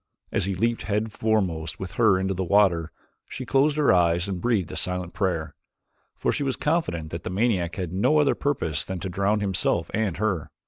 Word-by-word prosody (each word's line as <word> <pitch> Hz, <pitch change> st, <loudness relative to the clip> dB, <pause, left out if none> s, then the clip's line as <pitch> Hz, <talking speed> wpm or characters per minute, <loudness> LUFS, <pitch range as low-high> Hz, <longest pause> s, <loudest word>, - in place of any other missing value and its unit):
As -, -, +1 dB
he 95 Hz, -1 st, -2 dB
leaped 115 Hz, +5 st, 0 dB
head 105 Hz, +1 st, -1 dB
foremost 95 Hz, -8 st, -1 dB
with 95 Hz, -1 st, -5 dB
her 110 Hz, -5 st, +4 dB
into 95 Hz, +1 st, -1 dB
the 95 Hz, 0 st, -2 dB
water, 90 Hz, -4 st, +3 dB, 0.4 s
she 130 Hz, -, -6 dB
closed 140 Hz, +4 st, +2 dB
her 150 Hz, -8 st, +4 dB
eyes 85 Hz, 0 st, +2 dB
and 95 Hz, -3 st, -4 dB
breathed 110 Hz, -8 st, 0 dB
a -, -, -6 dB
silent 90 Hz, -1 st, -2 dB
prayer, 90 Hz, -6 st, -1 dB, 0.6 s
for -, -, 0 dB
she -, -, -2 dB
was 135 Hz, -2 st, 0 dB
confident 90 Hz, -, -1 dB
that 85 Hz, -, -5 dB
the -, -, -5 dB
maniac 95 Hz, -4 st, 0 dB
had 90 Hz, -3 st, -4 dB
no 100 Hz, +11 st, +3 dB
other 145 Hz, -2 st, +4 dB
purpose 105 Hz, -, -1 dB
than 95 Hz, -1 st, -5 dB
to 95 Hz, -, -3 dB
drown 100 Hz, +3 st, 0 dB
himself 90 Hz, -4 st, 0 dB
and 105 Hz, -5 st, -1 dB
her. 95 Hz, -6 st, -1 dB
95 Hz, 200 wpm, -25 LUFS, 85-110 Hz, 0.6 s, her